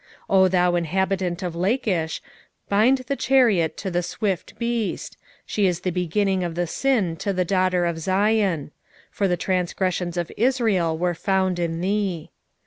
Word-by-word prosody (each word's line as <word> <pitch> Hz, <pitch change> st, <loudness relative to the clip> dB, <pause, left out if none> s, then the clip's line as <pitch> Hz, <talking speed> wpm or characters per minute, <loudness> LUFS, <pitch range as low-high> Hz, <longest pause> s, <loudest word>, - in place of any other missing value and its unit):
1:13 195 Hz, -, +5 dB
O 190 Hz, 0 st, +6 dB
thou 180 Hz, -1 st, +2 dB
inhabitant 180 Hz, +1 st, -1 dB
of 175 Hz, -2 st, -3 dB
Lachish, 185 Hz, -, -1 dB, 0.4 s
bind 220 Hz, +7 st, +4 dB
the 275 Hz, -, -1 dB
chariot 220 Hz, -, +3 dB
to 190 Hz, -, -4 dB
the 175 Hz, 0 st, +1 dB
swift 190 Hz, +1 st, -3 dB
beast: 235 Hz, -2 st, -2 dB, 0.3 s
she 205 Hz, -2 st, +1 dB
is 175 Hz, -1 st, -1 dB
the 185 Hz, -, -1 dB
beginning 185 Hz, +2 st, 0 dB
of 170 Hz, -2 st, -3 dB
the 175 Hz, 0 st, 0 dB
sin 205 Hz, -3 st, 0 dB
to 200 Hz, -, -2 dB
the 185 Hz, -1 st, 0 dB
daughter 185 Hz, -1 st, +1 dB
of 170 Hz, -1 st, -2 dB
Zion: 190 Hz, -4 st, +1 dB, 0.4 s
for 200 Hz, -, 0 dB
the 180 Hz, -1 st, 0 dB
transgressions 180 Hz, -1 st, -1 dB
of 175 Hz, -1 st, -2 dB
Israel 220 Hz, -9 st, +1 dB
were 175 Hz, +1 st, 0 dB
found 190 Hz, 0 st, 0 dB
in 165 Hz, -1 st, -2 dB
thee. 190 Hz, -4 st, -1 dB
185 Hz, 160 wpm, -23 LUFS, 175-200 Hz, 0.4 s, O